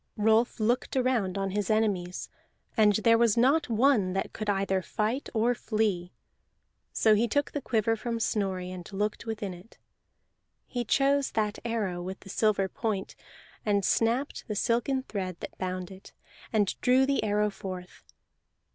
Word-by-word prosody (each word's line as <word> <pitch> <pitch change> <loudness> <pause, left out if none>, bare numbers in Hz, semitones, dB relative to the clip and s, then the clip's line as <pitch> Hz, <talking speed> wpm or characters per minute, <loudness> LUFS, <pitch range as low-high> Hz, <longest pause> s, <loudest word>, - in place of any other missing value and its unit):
Rolf 220 +3 +3
looked 240 +4 0
around 240 -7 +1
on 195 -1 -1
his 205 0 -2
enemies, 200 -5 0 0.5
and 210 -3 +5
there 230 +2 +4
was 235 -2 +3
not 275 +6 +3
one 225 -5 +3
that 195 - -2
could 215 -1 -4
either 195 -1 +1
fight 220 +8 -2
or 230 +2 +2
flee. 210 -7 -1 0.8
So 220 - +4
he 220 +3 +3
took 285 +6 0
the 290 - -3
quiver 225 -2 +1
from 230 +1 -3
Snorri, 190 -5 -1
and 180 +1 -8
looked 210 +3 -2
within 210 -4 -3
it; 180 +6 -15 0.9
he 245 -1 -3
chose 275 +4 +2
that 210 -1 -1
arrow 210 -7 -2
with 190 +2 -6
the 195 - -13
silver 200 -1 +2
point, 200 0 -3 0.5
and 200 -2 +1
snapped 240 +5 0
the 210 - -3
silken 240 +5 +1
thread 185 -7 -4
that - - -8
bound 185 0 -3
it, 190 0 -13 0.4
and 205 -4 +2
drew 260 +1 +4
the 275 -3 +1
arrow 210 0 +1
forth. 185 -2 -8
215 Hz, 155 wpm, -28 LUFS, 195-235 Hz, 0.9 s, and